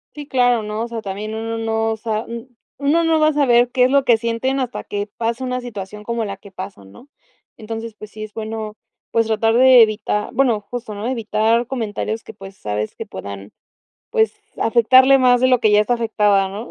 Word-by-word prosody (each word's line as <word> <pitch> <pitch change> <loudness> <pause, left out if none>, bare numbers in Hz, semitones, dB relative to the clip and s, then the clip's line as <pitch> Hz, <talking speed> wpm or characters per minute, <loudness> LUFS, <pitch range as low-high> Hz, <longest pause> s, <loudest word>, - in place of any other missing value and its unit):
Sí, 290 -1 -8
claro, 245 -4 +2
¿no? 210 +1 -4
O - - -4
sea, 230 -1 -5
también 205 +2 -5
uno 225 +1 -4
no 225 0 -1
sa 220 -1 -2
un 235 +1 -9 0.2
uno 295 +4 +2
no 325 -1 +2
va 310 0 +4
a - - -1
saber 245 -4 +3
qué 250 -1 +4
es - - +2
lo 280 -1 +4
que 235 -2 +5
sienten 235 +4 -1
hasta 250 -1 -3
que 205 0 -4
pasa 235 +2 -2
una 250 0 -2
situación 210 -3 -8
como 235 0 -2
la 200 -1 -5
que 195 0 -15
pasan, 185 - -9
¿no? 255 - -16 0.5
Entonces, 225 0 -7
pues 215 0 -11
sí 215 0 -8
es 215 - -8
bueno, 220 -1 -5 0.4
pues 230 0 +2
tratar 225 +1 +1
de 255 -1 +7
evita 210 -1 +1
bueno, 240 -4 +2
justo, 225 0 -7
¿no? 205 +3 -5
Evitar 230 -1 +1
comentarios 225 -3 -3
que, - - -11
pues, 195 0 -12
sabes 105 +1 -4
que - - -6
puedan, 100 0 -8 0.6
pues, 445 -2 +2 0.3
afectarle 255 +4 +5
más 250 -1 +4
de 255 - +4
lo 250 -1 +4
que 215 - +3
ya 210 - +6
está 245 +3 +1
afectada, 210 -4 +2
¿no? 210 +5 -7
225 Hz, 210 wpm, -20 LUFS, 210-245 Hz, 0.6 s, de